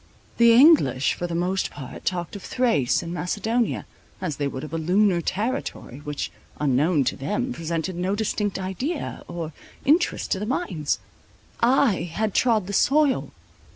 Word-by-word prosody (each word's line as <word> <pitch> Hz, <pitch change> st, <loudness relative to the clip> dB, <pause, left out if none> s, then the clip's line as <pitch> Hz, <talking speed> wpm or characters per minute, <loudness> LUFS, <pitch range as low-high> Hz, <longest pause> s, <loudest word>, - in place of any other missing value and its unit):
The 235 Hz, 0 st, +7 dB
English 235 Hz, -, +5 dB
for 175 Hz, -, -4 dB
the 170 Hz, -, -4 dB
most 185 Hz, +3 st, 0 dB
part 135 Hz, -3 st, -9 dB
talked 175 Hz, +1 st, -2 dB
of 200 Hz, -, -7 dB
Thrace 185 Hz, -, +1 dB
and 170 Hz, 0 st, -5 dB
Macedonia, 215 Hz, +6 st, -1 dB, 0.3 s
as 165 Hz, -7 st, -3 dB
they 145 Hz, -, 0 dB
would 130 Hz, -1 st, -5 dB
of 155 Hz, -, -8 dB
a 165 Hz, -, -1 dB
lunar 180 Hz, +2 st, +3 dB
territory, 215 Hz, -, -3 dB
which, 150 Hz, -1 st, -4 dB, 0.3 s
unknown 150 Hz, +2 st, +2 dB
to -, -, -1 dB
them, 210 Hz, -, -2 dB
presented 165 Hz, 0 st, -3 dB
no 185 Hz, +3 st, -1 dB
distinct 210 Hz, -1 st, -1 dB
idea 195 Hz, -, -4 dB
or 170 Hz, -2 st, -5 dB, 0.3 s
interest 325 Hz, +6 st, +2 dB
to 190 Hz, -, +1 dB
the 210 Hz, -, -3 dB
minds. 190 Hz, -, -1 dB, 0.6 s
I 240 Hz, -5 st, +3 dB
had 210 Hz, +3 st, -1 dB
trod 225 Hz, -6 st, +3 dB
the 200 Hz, -, -5 dB
soil. 285 Hz, +5 st, +3 dB
185 Hz, 155 wpm, -24 LUFS, 165-235 Hz, 0.6 s, The